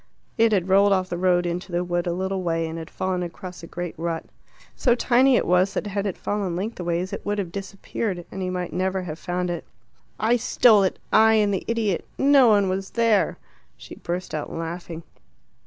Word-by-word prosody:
It 225 0 +4
had 190 -4 +1
rolled 200 +1 +5
off 185 -1 0
the 175 - -2
road 180 -1 +2
into 175 +2 -4
the 175 +1 0
wood 175 0 -1
a - - +1
little 190 +2 -2
way, 165 -2 -1
and 160 +1 -5
had 160 +1 -8
fallen 185 -1 -2
across 180 +1 -7
a 165 - -9
great 175 0 -5
rut. 165 -1 -3 0.5
So 240 -2 +3
tiny 250 +2 +4
it - - +2
was 180 +2 +2
that - - -1
had 200 0 -2
it 190 - -4
fallen 200 -4 -2
lengthways 180 -2 -3
it - - -5
would 205 0 -2
have 190 -4 -3
disappeared, 195 -1 -4
and 190 - -6
he 185 - -2
might 180 -2 -4
never 185 +1 -1
have 160 -2 -6
found 180 0 -2
it. 170 - -4 0.6
"I 230 +3 +3
stole 225 -2 +5
it! 190 - 0 0.2
I 220 0 +6
and 210 -2 +3
the 190 - -2
idiot 220 -6 0
no 275 -2 +6
one 205 -3 +4
was 190 +1 -2
there." 230 -3 +2 0.4
She - - -11
burst 180 +2 -5
out 155 -1 -4
laughing. 165 0 -6
185 Hz, 205 wpm, -24 LUFS, 175-205 Hz, 0.6 s, I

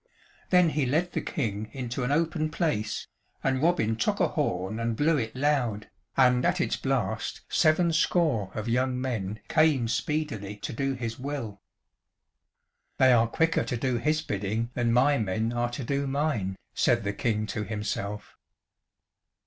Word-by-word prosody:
Then 180 -2 +5
he 150 -4 0
led 165 +7 +1
the - - -2
King 110 -6 -3
into 125 -1 -3
an 125 - 0
open 155 0 +1
place, 155 - -1 0.4
and 130 -1 +1
Robin 155 -10 +2
took 115 - 0
a - - +3
horn 95 +5 -1
and 115 0 -1
blew 155 +6 +3
it 115 -3 -3
loud, 130 -6 0 0.3
and 125 -2 +5
at - - +2
its - - +1
blast - - -2
seven 165 +2 +3
score 155 - +2
of 110 +1 -4
young 125 +2 +1
men 110 -5 -3
came 150 -7 +3
speedily 115 -3 -2
to 105 - -6
do 135 +3 -1
his 115 -2 -5
will. 125 -7 -5 1.4
"They 130 -1 +6
are 115 -1 +4
quicker 165 +3 +1
to 115 +1 -3
do 125 0 0
his 155 +5 +1
bidding 105 +3 -2
than 120 -2 +1
my 135 +4 +4
men 110 +3 -1
are 120 0 0
to 120 +3 -5
do 140 +3 -1
mine," 135 -9 -1 0.2
said 120 -2 +2
the 100 0 -1
King 110 -1 0
to 105 - -2
himself. 105 -1 -4
120 Hz, 160 wpm, -27 LUFS, 110-145 Hz, 1.4 s, They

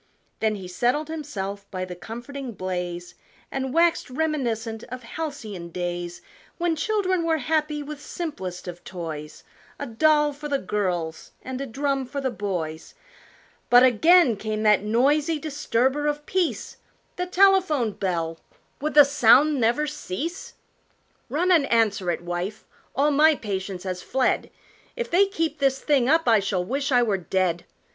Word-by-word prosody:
Then 220 -1 +1
he 190 -3 -7
settled 245 - 0
himself 205 -11 -5
by 185 -1 -4
the 180 - -7
comforting 240 +6 -7
blaze 180 -2 -4 0.4
And 265 -1 -2
waxed 335 0 +2
reminiscent 245 -6 -2
of 255 +1 -8
halcyon 225 - -6
days 175 0 -4 0.3
When 345 -1 0
children 375 +1 0
were 325 -1 +2
happy 305 +1 -1
with 295 0 -8
simplest 190 - -6
of 175 0 -8
toys: 160 -4 -7 0.3
A - - -4
doll 295 +5 +3
for 295 +1 -7
the 280 - +2
girls 180 -7 -3
and 260 +1 -5
a 275 - -4
drum 275 +1 -1
for 280 +2 -4
the 265 -2 -1
boys 175 -8 -4 0.7
But 245 +1 +8
again 260 - +5
came 215 +1 -3
that 210 -2 +5
noisy 280 +9 +2
disturber 290 -1 0
of 295 0 -2
peace 370 -3 -1 0.4
The 360 0 -3
telephone 365 - +4
bell 165 -5 -2 0.4
would 300 +2 -3
the 295 -1 +10
sound 280 +2 +5
never 240 +6 +2
cease? 300 - -5 0.7
"Run 355 +5 +1
and 315 -6 +3
answer 210 -5 +2
it, 170 - -1
wife, 175 +4 -4 0.3
all 290 +3 +3
my 305 +2 +5
patience 190 -5 -4
has 185 -2 -4
fled, 260 +5 0 0.5
If 475 -1 -4
they 390 +4 +5
keep 330 -6 -2
this 270 -1 +2
thing 270 -3 +2
up 325 +2 +3
I 225 -2 +6
shall 190 -2 -1
wish 275 +6 -2
I 245 -1 +5
were 210 -4 +1
dead! 180 -1 -1
255 Hz, 150 wpm, -24 LUFS, 195-300 Hz, 0.7 s, the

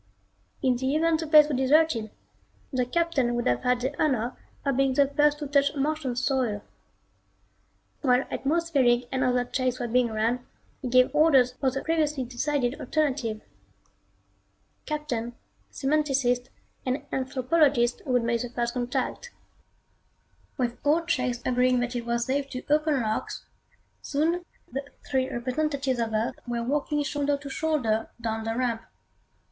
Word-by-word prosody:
In 255 -2 +3
the 260 +3 0
event 325 0 +2
the 325 - -3
place 300 -1 +7
was 295 - -1
deserted, 265 -4 +3 0.6
the 250 -1 +1
Captain 280 -5 +1
would 240 - -1
have 120 0 +1
had 250 0 +1
the 265 +3 -2
honor 250 -5 0 0.3
of 275 -2 +1
being 270 0 +2
the 280 - +5
first 295 +1 +2
to 295 - -5
touch 285 +1 +2
Martian 285 -2 -1
soil. 250 -5 0 1.4
While 255 -2 +3
atmospheric 275 -6 +1
and 265 0 0
other 250 -1 +2
checks 255 0 -1
were 240 - -2
being 245 +1 +2
run, 230 +3 -1 0.4
he 260 - -3
gave 255 +2 +4
orders 290 -5 +5
for 265 +1 0
the 270 +1 -4
previously 305 -4 0
decided 255 +1 -1
alternative. 265 -8 -1 1.5
Captain, 250 -6 -3 0.4
semanticist 270 -4 +1 0.3
and 265 +3 -2
anthropologist 260 -1 +2
would 250 -2 +2
make 235 0 0
the 245 - -4
First 235 0 -2
Contact. 250 - -2 1.3
With 245 -3 -1
all 315 +3 +2
checks 255 -6 -1
agreeing 250 0 +3
that 245 +1 -3
it 235 -1 -4
was 235 0 0
safe 275 +1 -1
to 255 -2 -6
open 300 -4 +2
locks, 215 0 -3 0.6
soon 330 +5 0 0.3
the 270 +3 -3 0.2
three 260 -1 0
representatives 265 +1 -1
of 230 -1 -1
Earth 220 +2 -1
were 235 -1 -2
walking 295 +3 0
shoulder 285 0 0
to 280 0 -9
shoulder 260 -9 0
down 225 -1 -3
the 225 +1 -2
ramp. 240 -3 0
260 Hz, 145 wpm, -27 LUFS, 240-295 Hz, 1.5 s, place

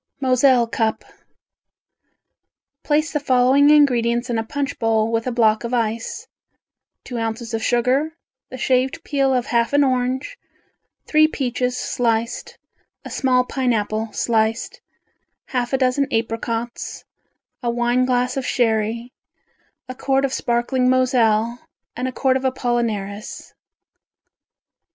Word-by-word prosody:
Moselle 255 -2 +4
Cup 225 -1 -2 1.8
Place 305 +1 0
the 295 - +1
following 265 +1 +4
ingredients 245 -4 +3
in 230 - 0
a - - -1
punch 285 +4 -4
bowl, 225 0 +1
with 230 +1 -1
a - - 0
block 220 -2 +2
of 235 +1 -2
ice, 225 -1 -2 0.8
two 245 -2 -5
ounces 225 +1 -4
of 225 - -1
sugar, 260 +7 +1 0.3
the 255 - -8
shaved 260 +5 0
peel 275 -2 +1
of 250 -2 +1
half 235 +2 0
an 285 0 +5
orange, 260 - -1 0.7
three 310 0 +4
peaches 250 -3 -2
sliced, 230 -2 -2 0.5
a - - -8
small 255 -2 +2
pineapple 225 -4 -1
sliced, 225 - -1 0.7
half 245 -2 -2
a 265 - +2
dozen 265 +2 +1
apricots, 230 +1 -3 0.6
a 240 - -1
wine 240 +1 +1
glass 250 0 0
of 270 - -2
sherry, 230 0 0 0.7
a 255 - -6
quart 270 +1 0
of 270 - -3
sparkling 245 +2 0
Moselle 240 -3 +2 0.4
and 250 +1 -2
a - - -3
quart 260 +1 +1
of 265 - -7
apollinaris. 230 -5 -3
245 Hz, 125 wpm, -21 LUFS, 230-260 Hz, 1.8 s, an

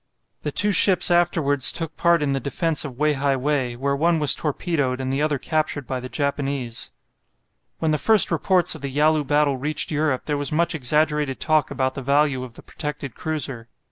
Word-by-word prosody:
The - - -4
two 210 -1 +2
ships 185 -2 +5
afterwards 165 -6 +4
took 165 -2 -5
part 170 -3 +2
in 140 - -1
the 135 - -1
defence 160 +3 -1
of 135 -5 -8
Wei 150 +1 +1
hai 140 0 0
wei, 130 -2 -1
where 140 +3 -1
one 165 +4 +1
was 150 -2 +5
torpedoed 145 -4 -2
and 130 0 -3
the 140 - -1
other 150 -1 0
captured 150 0 -2
by 130 0 -4
the 130 +1 -8
Japanese. 140 -4 -3 0.9
When 160 -1 -1
the 150 - 0
first 220 -5 +4
reports 175 +1 +1
of 160 - -9
the 140 - -4
Yalu 150 +2 +1
battle 145 -1 +1
reached 150 +5 0
Europe 150 -3 -1
there 150 -1 -2
was 145 -1 -4
much 170 +3 0
exaggerated 150 -1 0
talk 155 -2 +1
about 130 -1 -2
the 135 - -6
value 140 -1 +1
of 120 -2 -11
the - - -12
protected 150 -5 -6
cruiser. 140 -7 -4
145 Hz, 200 wpm, -22 LUFS, 135-155 Hz, 0.9 s, ships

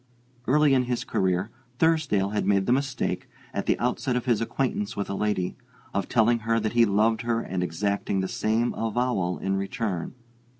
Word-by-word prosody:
Early 150 +1 +4
in 130 -1 +3
his 125 -1 -1
career 95 +3 0 0.3
Thursdale 145 -12 +2
had 105 -2 -1
made 100 -1 +3
the - - +1
mistake, 135 +1 -1 0.2
at - - -3
the - - +3
outset 125 +1 -1
of 125 - -1
his 120 -4 +2
acquaintance 115 -3 -2
with 100 -1 -2
a - - -1
lady, 100 -3 -1 0.4
of 100 -1 -1
telling 115 +1 +3
her 115 +1 +1
that 110 0 -2
he 120 -1 +5
loved 110 +2 +2
her 115 -1 0
and 95 -4 -3
exacting 100 +3 -1
the 95 - 0
same 110 +5 0
avowal 115 -5 -1
in 95 0 -1
return. 100 0 -3
110 Hz, 180 wpm, -26 LUFS, 100-120 Hz, 0.4 s, he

